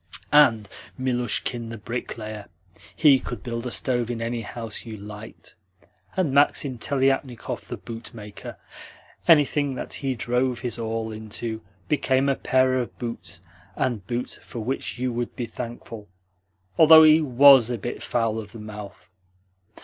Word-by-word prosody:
"And 120 -8 +5 0.3
Milushkin, 120 -2 -1
the 115 - -6
bricklayer! 110 -2 -6 0.5
He 140 -4 +6
could 120 -6 -7
build 115 +2 -4
a - - -2
stove 120 -1 -1
in 120 -1 -3
any 115 +1 -2
house 115 0 -6
you 110 -2 -8
liked! 105 +2 -10 0.6
And 170 -8 +1
Maksim 140 -2 +2
Teliatnikov, 135 -2 -1
the - - -5
bootmaker! 115 -3 -9 0.7
Anything 145 -3 +4
that - - -6
he 135 -2 -2
drove 125 +1 0
his 120 -2 -2
awl 110 0 -3
into 110 +1 -6 0.3
became 135 -2 +2
a 135 - +2
pair 130 0 +2
of 120 - -5
boots 115 -7 -7 0.3
and 110 -7 -2
boots 120 +1 -3
for - - -11
which 130 +3 -3
you 125 0 -2
would 120 0 -3
be 125 - -3
thankful, 115 -2 -8 0.7
although 160 0 +10
he 155 +1 +7
WAS 135 -3 +7
a 120 - -2
bit 120 +4 -5
foul 115 -2 -1
of 105 -2 -9
the 115 - -9
mouth. 105 -2 -9
120 Hz, 145 wpm, -24 LUFS, 110-130 Hz, 0.7 s, although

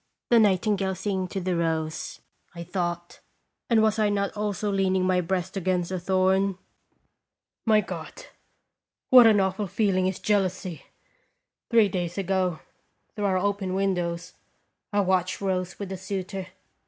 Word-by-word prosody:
The 235 - +7
nightingale 195 -1 +2
singing 190 0 -2
to 195 - -4
the 180 -1 -1
rose, 160 -1 -2 0.3
I 170 - -6
thought; 175 -1 -4 0.5
and 225 -2 +4
was 220 0 +2
I 210 -1 +3
not 200 -1 -1
also 210 -1 -2
leaning 190 -1 +1
my 185 -1 +2
breast 185 +2 -2
against 185 -2 -1
a 185 - -2
thorn? 190 +1 +1 1.1
My 215 -1 +5
God! 185 - -8 0.9
What 250 -3 +10
an 215 -2 +5
awful 190 +1 0
feeling 185 -2 +1
is 190 - -2
jealousy! 185 -4 -1 0.8
Three 230 -3 +5
days 175 -2 -3
ago, 185 -3 0 0.5
through 210 - -2
our 190 -2 +2
open 195 -1 -1
windows, 175 -3 -1 0.6
I 205 -1 +2
watched 185 -1 0
Rose 185 -2 -2
with 200 -2 -6
a 190 - -4
suitor. 190 0 -5
190 Hz, 140 wpm, -26 LUFS, 180-200 Hz, 1.1 s, What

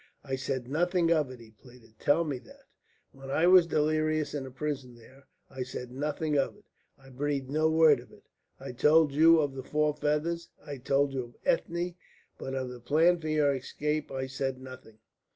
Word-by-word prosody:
"I 135 -2 -3
said 130 -2 -3
nothing 170 +4 +1
of 155 -5 +2
it," 130 -1 -10
he 115 -1 -15
pleaded, 115 0 -19
"tell 150 +4 +3
me 145 -5 -3
that! 120 - -18 0.5
When 135 0 -12
I 155 +5 +2
was 180 -1 +7
delirious 155 0 0
in 140 -3 -3
the - - -7
prison 135 -2 -5
there, 130 +4 -18 0.2
I 130 -1 -8
said 125 -1 -6
nothing 150 +3 -2
of 135 - -1
it, 210 - -23 0.3
I 135 -1 -17
breathed 135 0 -2
no 155 +2 +2
word 160 -4 +5
of 120 - -15
it? - - -18 0.4
I - - -7
told 150 +4 +4
you 160 +3 +6
of 145 -3 0
the 135 - -6
four 150 +3 0
feathers, 150 +3 -1 0.2
I 145 -2 -6
told 135 +2 +1
you 130 -2 -2
of 120 - -17
Ethne, 175 +1 0 0.5
but 135 - -5
of 130 -1 -3
the 125 -1 -9
plan 160 +8 +3
for 155 - -6
your 150 -2 +2
escape 150 +3 -3
I 130 0 -3
said 135 0 -3
nothing." 130 -4 -12
145 Hz, 200 wpm, -29 LUFS, 130-155 Hz, 0.5 s, was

